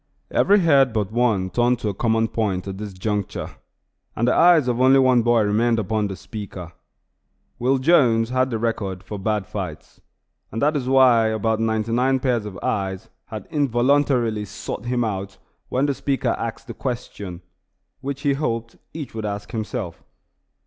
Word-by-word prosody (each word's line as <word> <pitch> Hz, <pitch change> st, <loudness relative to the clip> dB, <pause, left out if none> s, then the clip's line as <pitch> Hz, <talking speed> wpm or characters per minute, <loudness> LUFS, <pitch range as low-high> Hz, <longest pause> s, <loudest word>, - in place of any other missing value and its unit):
Every 205 Hz, 0 st, +4 dB
head 140 Hz, -7 st, +4 dB
but 105 Hz, -3 st, -1 dB
one 110 Hz, -6 st, +1 dB
turned 120 Hz, +4 st, +2 dB
to 105 Hz, -, -1 dB
a -, -, -2 dB
common 115 Hz, +2 st, +1 dB
point 100 Hz, -5 st, -2 dB
at 95 Hz, 0 st, -6 dB
this 105 Hz, -1 st, -5 dB
juncture, 100 Hz, +2 st, -3 dB, 0.6 s
and 120 Hz, -, 0 dB
the 125 Hz, -, +4 dB
eyes 170 Hz, -6 st, +5 dB
of 125 Hz, 0 st, 0 dB
only 130 Hz, +1 st, +6 dB
one 130 Hz, -2 st, +4 dB
boy 120 Hz, 0 st, +3 dB
remained 115 Hz, +3 st, +2 dB
upon 110 Hz, 0 st, 0 dB
the 95 Hz, -, -5 dB
speaker. 95 Hz, -3 st, -8 dB, 0.9 s
Will 130 Hz, +3 st, +2 dB
Jones 125 Hz, -6 st, +3 dB
had 130 Hz, 0 st, +1 dB
the 115 Hz, -, -2 dB
record 105 Hz, -5 st, -2 dB
for 100 Hz, +2 st, -7 dB
bad 105 Hz, 0 st, -1 dB
fights, -, -, -7 dB, 0.5 s
and 115 Hz, -, -4 dB
that 150 Hz, +5 st, +2 dB
is 130 Hz, -3 st, -2 dB
why 125 Hz, -4 st, +5 dB
about 110 Hz, 0 st, 0 dB
ninety 110 Hz, 0 st, 0 dB
nine 130 Hz, +3 st, +2 dB
pairs 120 Hz, -5 st, 0 dB
of 95 Hz, -3 st, -8 dB
eyes 95 Hz, -2 st, -2 dB, 0.2 s
had 110 Hz, -3 st, -7 dB
involuntarily 125 Hz, -4 st, +2 dB
sought 100 Hz, +3 st, -7 dB
him 120 Hz, 0 st, 0 dB
out 100 Hz, -3 st, -4 dB, 0.3 s
when 130 Hz, +2 st, +1 dB
the 145 Hz, -, +1 dB
speaker 135 Hz, -2 st, -1 dB
asked 115 Hz, +1 st, -3 dB
the 120 Hz, -, -7 dB
question, 100 Hz, -8 st, -5 dB, 0.6 s
which 140 Hz, 0 st, -5 dB
he 140 Hz, -1 st, +2 dB
hoped 115 Hz, -5 st, -3 dB, 0.2 s
each 150 Hz, -5 st, -6 dB
would 110 Hz, -1 st, -4 dB
ask 100 Hz, 0 st, -5 dB
himself. 105 Hz, -6 st, -4 dB
115 Hz, 170 wpm, -22 LUFS, 105-130 Hz, 0.9 s, only